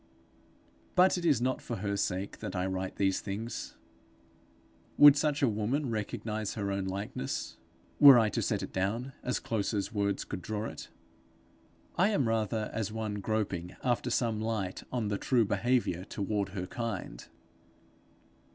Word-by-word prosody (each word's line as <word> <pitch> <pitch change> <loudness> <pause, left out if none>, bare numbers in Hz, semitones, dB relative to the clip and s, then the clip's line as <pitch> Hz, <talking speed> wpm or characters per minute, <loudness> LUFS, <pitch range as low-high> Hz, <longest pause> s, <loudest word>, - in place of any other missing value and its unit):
But 185 0 +5
it 175 -1 -3
is 145 -8 +3
not 130 0 0
for 120 - -4
her 100 0 -2
sake 100 0 -2
that - - -5
I 90 0 0
write 95 0 -3
these 95 -1 +1
things: 105 +4 -5 1.2
would 145 -1 +10
such 150 -1 0
a - - +6
woman 115 +5 -1
recognize 110 -1 -3
her 100 -2 -2
own 100 -1 -2
likeness, 95 -7 -4 0.4
were 140 -3 +10
I 110 -2 +4
to - - -1
set - - -1
it - - -7
down 115 +8 -1
as 125 - -1
close 110 -1 -2
as 100 +1 -2
words 100 -2 0
could 90 - -6
draw 105 +3 -3
it? - - -7 1.1
I 185 - +6
am 145 - +1
rather 110 -1 -1
as 110 -2 -2
one 110 -2 -3
groping 100 -5 -2
after 120 -2 0
some 115 -3 0
light 110 -4 -2
on 120 -4 -1
the 100 - -1
true 120 -4 +2
behaviour 100 -3 +1
toward 100 0 -2
her 95 -2 -4
kind. 115 - -5
110 Hz, 160 wpm, -30 LUFS, 100-120 Hz, 1.2 s, would